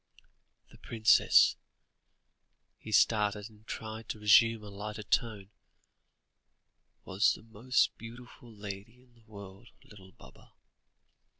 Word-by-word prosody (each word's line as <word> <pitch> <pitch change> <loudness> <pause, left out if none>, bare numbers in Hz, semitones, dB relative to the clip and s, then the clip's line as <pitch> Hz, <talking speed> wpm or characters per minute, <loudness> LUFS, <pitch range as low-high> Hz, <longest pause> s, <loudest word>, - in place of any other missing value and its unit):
The - - -18
princess" 110 -1 +4 1.2
he 110 - -10
started, 105 0 +1
and 110 0 -22
tried 110 0 -7
to 110 - -5
resume 110 +1 +4
a 105 - -10
lighter 105 +1 -7
tone 105 -3 -2 1.5
"was 95 +4 +2
the - - -12
most 115 +3 0
beautiful 120 +1 -12
lady 105 +3 -10
in 125 -1 -28
the 115 -1 -26
world, 100 +2 -12
little 95 -3 -16
Baba." - - -19
110 Hz, 110 wpm, -30 LUFS, 105-115 Hz, 1.5 s, princess